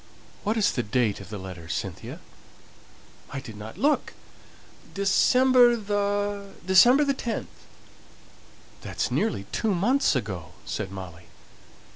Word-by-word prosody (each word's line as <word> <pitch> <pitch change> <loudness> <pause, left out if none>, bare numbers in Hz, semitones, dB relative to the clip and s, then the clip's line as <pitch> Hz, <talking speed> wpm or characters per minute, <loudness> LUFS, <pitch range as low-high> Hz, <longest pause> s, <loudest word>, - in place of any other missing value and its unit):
"What 215 +2 0
is 205 -2 +3
the 120 - -1
date 110 -2 0
of 95 - -11
the 105 - -5
letter, 95 -4 -9
Cynthia?" - - -5 1.1
"I 135 - -5
didn't 110 -4 -9
look. 295 +2 +1 0.8
December 245 +5 +5
the 205 -1 -2
December 240 +10 +6
the 280 - +2
10th." 235 -4 -6 1.1
"That's - - -3
nearly 100 - 0
two 215 -4 0
months 245 - +2
ago," 95 -8 -4
said 105 -3 -4
Molly. 90 -3 -9
195 Hz, 115 wpm, -26 LUFS, -, 1.1 s, December